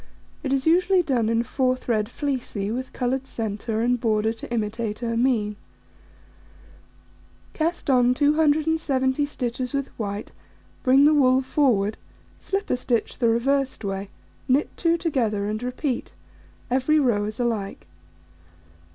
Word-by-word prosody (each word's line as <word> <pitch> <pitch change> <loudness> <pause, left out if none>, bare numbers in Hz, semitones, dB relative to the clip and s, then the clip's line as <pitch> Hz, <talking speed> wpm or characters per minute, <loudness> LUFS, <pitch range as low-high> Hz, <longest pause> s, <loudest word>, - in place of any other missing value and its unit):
It 275 - -3
is 270 -1 +1
usually 360 +3 +4
done 245 -8 +1
in 230 +1 +2
4 255 +1 +1
thread 220 -4 -1
fleecy, 250 -8 -3
with 255 +3 -4
coloured 260 +1 -2
centre, 220 0 -3
and 245 +1 +2
border 220 -1 +1
to 230 - -10
imitate 220 0 -2
ermine. 230 -3 +1 2.0
Cast 330 +1 -2
on 250 -2 +4
270 295 -2 +2
stitches 250 -1 -3
with 275 -1 -2
white, 205 -1 -4 0.5
bring 265 +2 +5
the 300 +1 +6
wool 260 -2 +4
forward, 225 -7 +1 0.4
slip 395 +1 -3
a - - +2
stitch 240 -3 -1
the 235 -2 +3
reversed 265 +1 0
way, 195 0 -3 0.4
knit 265 +3 +1
2 335 0 +2
together, 240 - 0
and 215 +1 -3
repeat: 250 +1 -3 0.6
every 265 +5 +3
row 230 -7 +2
is 215 +2 -6
alike. 210 - -2
250 Hz, 130 wpm, -24 LUFS, 225-280 Hz, 2.0 s, the